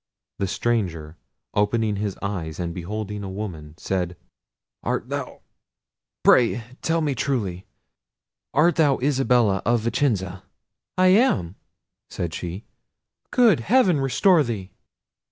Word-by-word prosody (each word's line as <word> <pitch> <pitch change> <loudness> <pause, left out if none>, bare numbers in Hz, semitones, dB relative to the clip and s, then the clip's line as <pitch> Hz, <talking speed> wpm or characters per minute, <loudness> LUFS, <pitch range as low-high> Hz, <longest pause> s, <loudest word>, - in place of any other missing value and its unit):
The 100 - 0
stranger, 90 -9 -2 0.4
opening 105 0 +1
his 100 -1 -3
eyes, 90 -6 -4
and 85 -1 -3
beholding 105 +3 -5
a 95 - -5
woman, 85 -7 -6
said, 90 -2 -2 0.6
"Art - - -2
thou—pray 120 -1 -1 0.2
tell 165 0 +1
me 150 -3 0
truly—art 125 - -3
thou 145 -4 +4
Isabella 125 -7 +2
of 120 0 +2
Vicenza?" 110 -6 -1 0.6
"I 185 0 +5
am," 185 - +3 0.6
said 85 -3 -4
she: 90 +5 -6 0.6
"good 230 - +4
heaven 185 - +3
restore 160 +6 +4
thee!" 105 -8 -4
105 Hz, 105 wpm, -23 LUFS, 90-135 Hz, 0.6 s, I